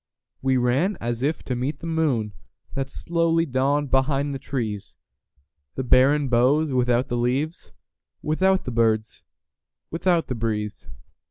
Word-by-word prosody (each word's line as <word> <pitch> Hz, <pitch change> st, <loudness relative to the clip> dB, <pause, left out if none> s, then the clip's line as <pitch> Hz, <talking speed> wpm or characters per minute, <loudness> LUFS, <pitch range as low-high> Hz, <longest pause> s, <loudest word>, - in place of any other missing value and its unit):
We 130 Hz, -1 st, +2 dB
ran 135 Hz, +11 st, +1 dB
as 120 Hz, 0 st, -3 dB
if 150 Hz, +4 st, -1 dB
to 125 Hz, -, -3 dB
meet 135 Hz, +4 st, -3 dB
the -, -, -9 dB
moonThat 135 Hz, -3 st, -3 dB
slowly 165 Hz, 0 st, 0 dB
dawned 140 Hz, +1 st, 0 dB
behind 135 Hz, +1 st, +1 dB
the 135 Hz, -, -4 dB
trees, 115 Hz, -7 st, -4 dB, 0.8 s
The 130 Hz, -, -2 dB
barren 135 Hz, +3 st, +4 dB
boughs 130 Hz, +5 st, +3 dB
without 125 Hz, 0 st, +2 dB
the 120 Hz, -, -2 dB
leaves, 135 Hz, +7 st, -1 dB, 0.5 s
Without 190 Hz, +5 st, +2 dB
the 125 Hz, -, -3 dB
birds, 110 Hz, -2 st, 0 dB, 0.7 s
without 170 Hz, 0 st, +1 dB
the -, -, -3 dB
breeze. 110 Hz, -3 st, -3 dB
135 Hz, 135 wpm, -24 LUFS, 120-155 Hz, 0.8 s, barren